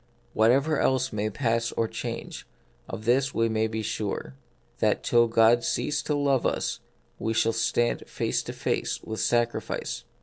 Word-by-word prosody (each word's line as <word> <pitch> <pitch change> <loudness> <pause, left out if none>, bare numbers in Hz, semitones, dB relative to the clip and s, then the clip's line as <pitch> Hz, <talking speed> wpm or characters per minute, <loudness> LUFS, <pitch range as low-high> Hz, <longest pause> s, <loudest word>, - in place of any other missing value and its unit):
Whatever 135 +7 +3
else 130 -1 +1
may 105 0 -1
pass 115 0 0
or 115 - 0
change, - - -6 0.4
of 110 - -6
this 130 +3 +2
we 115 0 +2
may 110 0 +1
be 110 0 -4
sure, 110 +1 -3 0.5
that 110 - +1
till 120 -1 +4
God 115 +1 +4
cease 150 0 0
to 150 - -1
love 140 -3 +2
us - - -1 0.4
we 110 0 -1
shall 115 +1 +2
stand 115 +1 0
face - - -1
to - - -5
face - - -2
with 110 0 -5
sacrifice. 120 +1 -1
115 Hz, 160 wpm, -27 LUFS, 110-130 Hz, 0.5 s, till